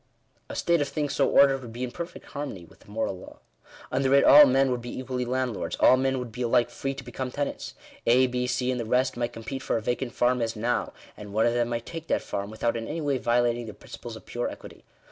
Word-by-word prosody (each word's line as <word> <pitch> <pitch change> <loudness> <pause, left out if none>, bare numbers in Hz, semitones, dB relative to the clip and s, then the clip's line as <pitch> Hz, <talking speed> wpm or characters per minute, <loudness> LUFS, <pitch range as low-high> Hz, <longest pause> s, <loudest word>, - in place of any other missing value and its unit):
A - - -6
state 170 -2 +2
of 145 - 0
things 145 -1 -2
so 135 - +2
ordered 135 -1 +5
would 120 -3 -9
be 120 +2 -5
in 125 - -3
perfect 170 +6 -7
harmony 140 - -6
with - - -20
the - - -20
moral 105 -3 -2
law. - - -12 0.5
Under 135 +1 +2
it 140 - +6
all 145 0 +9
men 135 0 +3
would 125 -1 -1
be 120 - -7
equally 130 -1 -3
land 130 0 -1
lords; - - -3
all - - +7
men 135 +1 0
would 125 -2 -5
be 125 +3 -7
alike 120 0 +2
free 135 0 -3
to 140 - -8
become 125 +1 -5
tenants. 145 +3 -4 0.3
A, 125 +2 +6
B, 125 0 -1
C, 125 0 0
and 125 - -2
the 115 - -3
rest, 125 +4 +1
might 120 0 -2
compete 120 +4 -6
for 130 - 0
a - - -3
vacant 120 +1 -2
farm 125 0 +2
as 115 0 -1
now, 120 +3 -1 0.2
and 105 -1 -10
one 110 +1 +3
of 120 - +2
them 120 -1 +1
might 115 -1 -3
take 165 -1 -7
that - - 0
farm, 100 0 -4
without 110 +2 -1
in 115 -1 -4
any 160 +3 -3
way 145 -4 0
violating 120 0 +1
the 110 - -8
principles - - -9
of - - -12
pure - - -3
equity. - - -11
125 Hz, 260 wpm, -27 LUFS, 120-135 Hz, 0.5 s, all